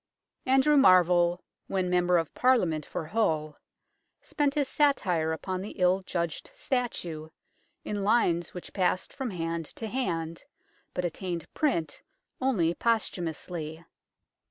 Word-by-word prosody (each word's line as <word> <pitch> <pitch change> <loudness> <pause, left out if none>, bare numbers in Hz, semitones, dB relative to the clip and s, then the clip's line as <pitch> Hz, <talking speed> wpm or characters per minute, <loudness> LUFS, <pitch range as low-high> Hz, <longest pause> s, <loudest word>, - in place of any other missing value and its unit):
Andrew 270 +3 +5
Marvell, 180 -6 +5 0.2
when 185 -2 0
Member 180 0 +3
of 165 -2 -2
Parliament 180 - +2
for - - -4
Hull, 155 -6 0 0.6
spent 285 -1 0
his 290 -2 +1
satire 190 - +2
upon 185 +3 -3
the 205 - -7
ill 185 0 +3
judged 170 -3 -3
statue, 175 - -3 0.6
in 205 -1 -2
lines 180 -6 +2
which 180 - -8
passed 185 -1 0
from 265 -3 -3
hand 165 -3 -3
to 225 - -6
hand, 170 -9 -2 0.5
but 180 - -1
attained 175 -1 -4
print 170 - -1 0.4
only 195 -11 +2
posthumously. 170 -7 -2
180 Hz, 120 wpm, -28 LUFS, 165-230 Hz, 0.6 s, Andrew